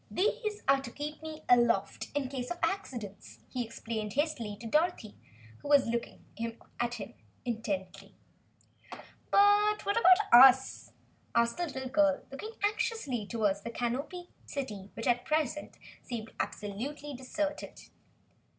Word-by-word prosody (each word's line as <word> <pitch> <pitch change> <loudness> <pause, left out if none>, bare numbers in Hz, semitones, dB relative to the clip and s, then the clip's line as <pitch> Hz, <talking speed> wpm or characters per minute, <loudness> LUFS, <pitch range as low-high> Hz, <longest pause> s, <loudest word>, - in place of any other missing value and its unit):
"These 425 +2 -1
are 275 0 +6
just 270 - -7
to 235 - -7
keep 300 +1 -5
me 315 -1 -8
aloft 240 -5 +3
in 285 -2 0
case 255 -2 -5
of 350 - -3
accidents," 250 - -3
he 250 -2 -3
explained 220 -2 -5
hastily 265 -8 -1
to 230 - -9
Dorothy 300 - +1 0.5
who - - -9
was 285 -2 +6
watching 235 0 -4
him 230 +2 -5 0.9
intently. 195 -4 -4 1.1
"But 410 +1 +4
what 405 - +1
of 465 - +2 0.3
us?" 260 +1 +7 0.4
asked 235 0 +3
the 350 -1 -1
little 265 -3 -5
girl, 290 +1 +3
looking 430 +12 -7
anxiously 420 - -1
toward 210 -4 +1
the - - -4
Canopied 275 +10 -3 0.2
City 210 -9 -5
which, 225 - -5
at 245 0 +2
present, 305 -1 -1 0.2
seemed 225 -3 -6
absolutely 275 +9 -4
deserted. 290 +4 -4
260 Hz, 130 wpm, -31 LUFS, 230-310 Hz, 1.1 s, us